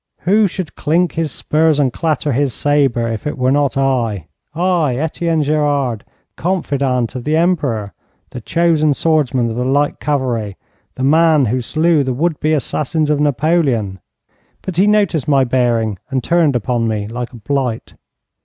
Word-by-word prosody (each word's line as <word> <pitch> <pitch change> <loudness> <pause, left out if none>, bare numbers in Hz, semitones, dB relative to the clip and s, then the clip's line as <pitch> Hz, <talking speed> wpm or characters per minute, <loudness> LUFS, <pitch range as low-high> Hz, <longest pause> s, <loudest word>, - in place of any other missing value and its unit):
Who 205 +4 +3
should 185 -3 -6
clink 170 +4 +1
his 160 -3 -2
spurs 155 +1 +1
and 130 -4 +1
clatter 155 -2 -1
his 135 0 0
sabre 135 -5 +1
if 115 +4 -4
it 150 - -4
were 130 0 +1
not 140 -1 +1
I 120 - 0 0.3
I, 170 -6 +1
Etienne 160 +2 -1
Gerard 145 -6 0 0.3
the - - -17
confidant 140 -9 -1
of 125 - -6
the 155 +3 +1
Emperor, 140 - 0 0.4
the 125 - -7
chosen 155 +1 +1
swordsman 130 -8 +1
of - - -5
the 125 - -1
light 145 +3 0
cavalry, 125 -8 -2 0.4
the 130 - -4
man 155 0 +4
who 125 +3 -1
slew 155 +4 +1
the 130 -2 -2
would 160 +3 -1
be 155 +1 +1
assassins 150 +1 -1
of 150 - +1
Napoleon? 140 - 0 0.6
But 185 -3 -5
he 195 +3 +4
noticed 205 -9 +1
my 140 -2 +3
bearing 120 -5 0
and 130 -2 -2
turned 165 -3 +2
upon 120 0 0
me 105 -2 -2
like 120 +2 -5
a 120 - -11
blight. 125 0 -3
145 Hz, 165 wpm, -17 LUFS, 125-160 Hz, 0.6 s, man